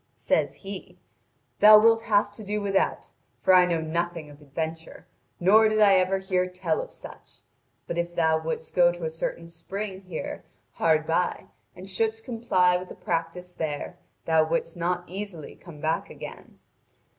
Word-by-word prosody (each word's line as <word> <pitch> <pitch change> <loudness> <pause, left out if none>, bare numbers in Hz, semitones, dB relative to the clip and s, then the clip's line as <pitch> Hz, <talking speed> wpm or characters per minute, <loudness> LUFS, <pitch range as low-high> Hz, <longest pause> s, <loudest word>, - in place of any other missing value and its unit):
Says - - 0
he: 195 -1 -8 0.6
'Thou 215 0 +10
wilt 225 +1 +5
have 205 -1 +2
to 215 +1 -10
do 210 +1 -2
without, 200 -1 -1 0.3
for 190 - +3
I 180 -1 +7
know 170 -2 0
nothing 165 -1 -3
of 145 +1 -16
adventure, 160 +3 -6 0.3
nor 215 +5 +5
did 215 0 0
I 205 -2 +6
ever 185 +1 +2
hear 185 -1 0
tell 180 - -1
of - - -9
such. - - -13 0.4
But 170 - -3
if 170 0 -3
thou 160 -1 +2
wouldst 160 0 -5
go 175 -1 +5
to 175 -1 -6
a 160 - -2
certain 165 +1 -5
spring 190 +3 -6
here 180 -4 -6 0.3
hard 155 -1 +2
by 170 +2 -1 0.3
and 185 +1 -10
shouldst 220 +3 -2
comply 185 -7 +2
with 180 0 -8
the - - -9
practice 175 +1 -4
there, 150 -4 -4 0.3
thou 160 -1 +4
wouldst 165 +1 -2
not 175 +1 -1
easily 185 -4 -7
come 165 -4 -13
back 160 +2 -1
again. - - -10
180 Hz, 170 wpm, -26 LUFS, 165-195 Hz, 0.6 s, Thou